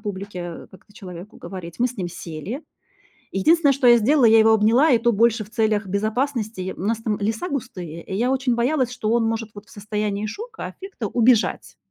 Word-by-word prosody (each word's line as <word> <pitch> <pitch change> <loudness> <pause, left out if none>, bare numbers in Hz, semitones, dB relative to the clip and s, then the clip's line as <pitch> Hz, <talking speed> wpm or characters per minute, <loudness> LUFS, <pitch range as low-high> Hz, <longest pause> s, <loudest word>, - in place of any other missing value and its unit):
публике, 200 -2 -6
э, 175 -1 -7
как-то 190 +2 -18
человеку 185 -1 -10
говорить. 180 -2 -9
Мы 245 - +3
с 250 0 -7
ним 180 -4 -3
сели. 175 - -7 0.7
Единственное, 290 - +4
что 265 -1 +2
я 240 0 +8
сделала, 260 +4 +3
я 225 0 +7
его 220 0 +5
обняла, 225 +8 +4
и 245 - +6
то 235 +1 +1
больше 225 0 +2
в - - -19
целях 215 -2 0
безопасности. 215 -1 -2
У - - -9
нас 220 +3 0
там 215 -2 -1
леса 220 - -2
густые, 185 - -6
и - - -8
я 240 +5 +1
очень 265 -2 +1
боялась, 250 +1 +1
что 225 -3 -2
он 235 -1 +2
может 225 -1 -2
вот 205 +2 -11
в - - -19
состоянии 210 -1 -3
шока, 440 - -7
аффекта 380 - -6
убежать, 235 +1 +2
220 Hz, 200 wpm, -22 LUFS, 200-245 Hz, 0.7 s, я